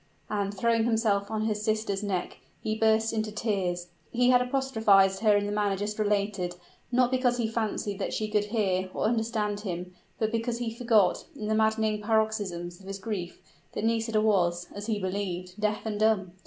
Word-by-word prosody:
And, 200 -1 0
throwing 225 +3 +1
himself 220 -4 +1
on 215 -1 -1
his 215 -1 -1
sister's 215 -2 0
neck, 195 -4 -3 0.2
he 215 - -2
burst 220 0 +2
into 215 -1 -1
tears. 190 -5 -2 0.2
He 245 +1 +4
had 250 0 +5
apostrophized 220 -7 +3
her 210 -1 +4
in 205 - 0
the 205 - -2
manner 205 -2 +1
just 210 +2 -3
related, 200 -4 0 0.4
not 250 0 +3
because 255 -1 +2
he 235 -2 0
fancied 215 -3 -2
that - - -2
she 215 - -1
could 210 -1 +1
hear 195 -4 0
or - - -1
understand 220 -2 0
him; 180 -3 -5 0.2
but 220 -1 0
because 230 +1 -1
he 235 -2 -3
forgot, 225 -6 +2
in 215 - -6
the - - +2
maddening 220 -1 +2
paroxysms 205 -6 -1
of 190 - -14
his 195 0 -4
grief, 190 -3 -5 0.3
that - - -3
Nisida 225 -1 +1
was 175 -5 +2
(as 205 +1 -6
he 220 -2 0
believed) 185 -1 -4
deaf 210 +1 0
and 210 -2 -2
dumb! 215 -4 +2
215 Hz, 185 wpm, -28 LUFS, 195-225 Hz, 0.4 s, had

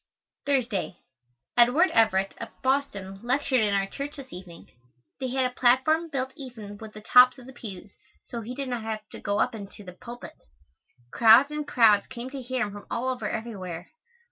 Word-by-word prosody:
Thursday. 235 -10 0 0.6
Edward 250 +10 +5
Everett, 195 -4 +3
of 230 - -5 0.2
Boston, 205 -8 -1
lectured 255 +1 +1
in 210 -2 +2
our 195 0 +1
church 280 +8 -6
this 275 -3 -10
evening. 175 -2 -11 0.5
They 260 - -2
had 260 +1 +1
a 250 - -2
platform 260 +8 +3
built 265 -2 -3
even 225 -8 -9
with 220 -1 -10
the 215 - -10
tops 250 +4 +6
of 250 - -13
the 265 - -11
pews, 200 -5 -9 0.3
so 235 - -6
he 240 +3 -7
did 275 -1 -4
not 245 -2 -2
have 215 -1 -5
to - - -10
go 205 0 -1
up - - +1
into 205 -1 -9
the 180 -2 -10
pulpit. 240 +5 -10 0.8
Crowds 235 +5 +7
and 300 -1 -4
crowds 215 -4 +4
came 245 +2 -7
to 275 -1 -6
hear 255 0 -1
him 205 - -7
from 205 - -10
all 255 +2 -1
over 245 -5 -2
everywhere. 185 -7 -6
240 Hz, 190 wpm, -26 LUFS, 205-260 Hz, 0.8 s, Crowds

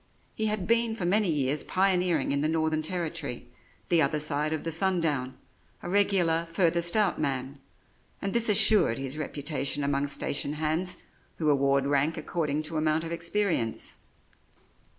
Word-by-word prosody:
He 220 - -1
had 210 -3 -2
been 230 0 +1
for 190 - -4
many 200 +2 +2
years 145 -1 0
pioneering 185 -2 +1
in 140 0 0
the 155 - +1
Northern 160 -1 0
Territory, 160 -6 -4 0.4
the 170 -2 +3
other 150 +1 +1
side 150 0 -1
of 160 - -3
the 165 - -3
sun 185 +3 +2
down 140 -6 -2 0.5
a 175 - -5
regular 180 -5 +2
"furthest 170 +1 +1
out 205 -4 +1
man" 135 -1 -3 0.6
and 195 - -4
this 235 -1 +4
assured 210 - +6
his 135 +2 -3
reputation 145 -1 -2
among 140 0 -1
station 140 0 -2
hands 160 +4 -2 0.4
who 155 -2 +1
award 140 -1 +1
rank 145 +3 0
according 155 -1 -2
to 160 +1 -2
amount 155 +1 0
of 165 - -6
experience. 170 - -2
160 Hz, 155 wpm, -27 LUFS, 145-180 Hz, 0.6 s, assured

